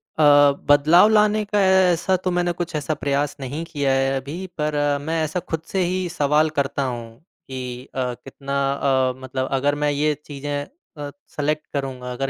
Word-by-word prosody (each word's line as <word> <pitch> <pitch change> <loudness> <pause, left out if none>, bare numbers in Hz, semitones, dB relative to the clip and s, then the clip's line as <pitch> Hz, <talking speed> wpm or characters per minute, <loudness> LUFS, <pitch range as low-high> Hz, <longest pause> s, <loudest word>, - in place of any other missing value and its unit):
अ, 155 - +2 0.5
बदलाव 155 +7 +6
लाने 215 0 +3
का 205 0 +1
ऐसा 190 -1 +3
तो 185 0 -2
मैंने 175 0 +1
कुछ 175 -2 -3
ऐसा 150 +1 -1
प्रयास 145 0 -1
नहीं 140 +4 -4
किया 145 -5 -1
है 135 0 +2
अभी। 150 +8 -6
पर 150 -1 -1 0.3
मैं 160 +2 -1
ऐसा 155 +4 -2
खुद 160 -2 -4
से 190 - +1
ही 180 +1 -1
सवाल 150 -1 +2
करता 140 0 -1
हूँ 120 -3 -5 0.3
कि 125 -1 -6
अ, 125 -2 -1
कितना 135 +3 -8 0.2
अ, 130 -2 +1
मतलब 130 0 -3
अगर 140 +2 +1
मैं 150 - +3
ये 150 +1 +1
चीज़ें 145 0 -4 0.3
अ, 145 -1 -6 0.2
सेलेक्ट 150 +1 -2
करूँगा, 130 -3 -4
अगर 135 +2 -2
145 Hz, 175 wpm, -22 LUFS, 135-165 Hz, 0.5 s, बदलाव